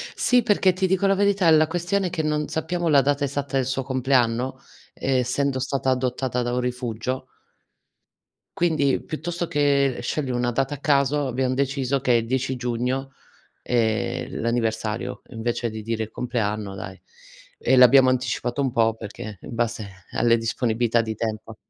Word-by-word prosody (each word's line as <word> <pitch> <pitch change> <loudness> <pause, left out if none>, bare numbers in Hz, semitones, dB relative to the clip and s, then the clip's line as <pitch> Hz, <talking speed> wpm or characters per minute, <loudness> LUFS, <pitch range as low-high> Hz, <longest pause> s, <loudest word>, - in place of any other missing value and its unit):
Sì, 250 -2 +3
perché 195 -4 +3
ti 190 +1 0
dico 190 +1 +2
la 195 - +3
verità, 200 -3 +3
la 155 0 +6
questione 180 +3 -1
è - - -3
che 165 -2 -2
non 150 -1 -1
sappiamo 170 +1 -1
la 140 -2 +6
data 145 +1 0
esatta 140 0 -3
del 130 -2 +2
suo 135 +1 -2
compleanno, 130 -1 +1
uhm, - - -26 0.4
essendo 130 +1 0
stata 135 0 -1
adottata 125 -1 0
da 120 0 -2
un 125 - 0
rifugio 125 +1 -3 1.3
quindi, 155 -6 +2
piuttosto 170 +2 -4
che 140 -3 +2
scegliere 130 0 -2
1 120 0 0
data 135 +4 -1
a - - -10
caso, 145 0 +2
abbiam 130 +1 0
deciso 135 0 0
che 120 -3 +2
10 130 +1 -1
giugno, 125 +3 -2 0.5
ehm, 110 -3 -1
l'anniversario, 115 -1 -2
invece 120 0 -2
di 110 0 -6
dire 110 0 -2
il 110 - -8
compleanno, 105 -5 -2
dai. 95 0 -8 0.6
E 130 - +2
l'abbiamo 130 +1 +7
anticipato 125 +1 -1
un 135 -3 0
po', 115 -1 +2
perché 105 -2 -8
in 120 - -8
base 110 -5 -3
alle 115 0 +3
disponibilità 115 0 +1
di 110 -1 -4
tempo. 110 0 -4
130 Hz, 160 wpm, -24 LUFS, 115-140 Hz, 1.3 s, l'abbiamo